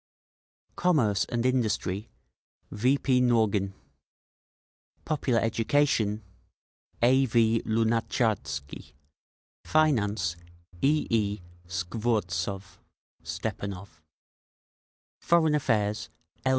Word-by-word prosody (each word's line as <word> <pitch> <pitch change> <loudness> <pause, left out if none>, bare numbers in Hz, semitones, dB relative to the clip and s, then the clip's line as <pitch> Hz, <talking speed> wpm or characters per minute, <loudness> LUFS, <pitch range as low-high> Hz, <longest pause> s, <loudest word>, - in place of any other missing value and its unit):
Commerce 125 - +2
and 120 0 -2
Industry: 110 -5 0 0.6
V. 125 +7 +2
P. 130 -2 +2
Nogin 110 -5 +2 1.3
Popular 140 -6 +1
Education: 115 -2 +1 0.8
A. 130 +2 +4
V. 115 -1 +3
Lunatcharsky 110 - -1 0.7
Finance: 105 - +1 0.4
E. 150 +2 +2
E. 105 -2 +1 0.3
Skvortsov 95 0 -2 0.4
(Stepanov) 95 -4 -6 1.2
Foreign 165 -3 +3
Affairs: 110 -6 0 0.4
L. - - +3
110 Hz, 70 wpm, -27 LUFS, 100-130 Hz, 1.3 s, A